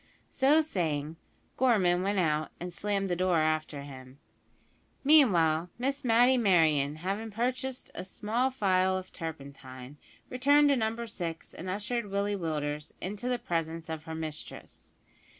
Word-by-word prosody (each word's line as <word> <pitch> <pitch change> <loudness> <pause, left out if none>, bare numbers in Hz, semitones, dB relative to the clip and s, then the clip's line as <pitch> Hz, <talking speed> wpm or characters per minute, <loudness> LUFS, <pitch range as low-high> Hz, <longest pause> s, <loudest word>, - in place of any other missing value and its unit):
So 285 +4 +4
saying, 160 - -2 0.4
Gorman 195 -9 +3
went 200 +2 0
out, 155 -3 +1
and 175 0 -6
slammed 200 -1 -1
the 175 - 0
door 180 -1 +2
after 155 -2 0
him. 130 -1 -11 0.9
Meanwhile, 180 - +4
Miss 275 +3 -2
Matty 245 +2 +4
Merryon, 155 -8 +3
having 195 +7 -3
purchased 255 +4 -3
a - - -6
small 220 +7 -1
phial 190 -6 +1
of 185 0 -8
turpentine, 140 -4 -8 0.3
returned 285 +3 +4
to 280 - +4
Number 230 0 -1
6, 170 -7 -6
and 185 - -7
ushered 210 +4 -2
Willie 200 +1 -1
Willders 150 -4 -3
into 205 +6 -4
the 250 - +1
presence 165 -4 -3
of 160 0 -5
her 160 -1 -6
mistress. 155 -1 -8
185 Hz, 140 wpm, -29 LUFS, 160-235 Hz, 0.9 s, So